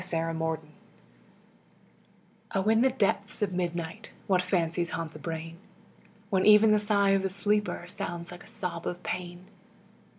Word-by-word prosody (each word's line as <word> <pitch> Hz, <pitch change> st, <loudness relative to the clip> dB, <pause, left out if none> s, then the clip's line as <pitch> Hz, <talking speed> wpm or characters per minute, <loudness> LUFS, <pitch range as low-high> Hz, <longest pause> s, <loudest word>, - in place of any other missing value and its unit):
IN -, -, -8 dB
THE 165 Hz, 0 st, -1 dB
DARK 160 Hz, 0 st, -1 dB, 1.9 s
O 195 Hz, -, +2 dB
In 225 Hz, +1 st, +5 dB
the 265 Hz, -, +5 dB
depths 210 Hz, -4 st, 0 dB
of 195 Hz, -3 st, -1 dB
midnight 175 Hz, +3 st, -3 dB
What 185 Hz, -2 st, +3 dB
fancies 175 Hz, -2 st, 0 dB
haunt 165 Hz, -1 st, -4 dB
the 155 Hz, -, -10 dB
brain! 165 Hz, +1 st, -5 dB, 0.7 s
When 190 Hz, -1 st, +3 dB
even 215 Hz, +1 st, +7 dB
the 210 Hz, -, +5 dB
sigh 205 Hz, -1 st, +3 dB
of 195 Hz, 0 st, +3 dB
the 190 Hz, -, -1 dB
sleeper 205 Hz, -1 st, 0 dB
Sounds 175 Hz, -1 st, -5 dB
like 175 Hz, 0 st, -10 dB
a -, -, -16 dB
sob 185 Hz, -6 st, -4 dB
of 180 Hz, 0 st, -4 dB
pain. 180 Hz, 0 st, -5 dB
180 Hz, 160 wpm, -29 LUFS, 170-205 Hz, 1.9 s, even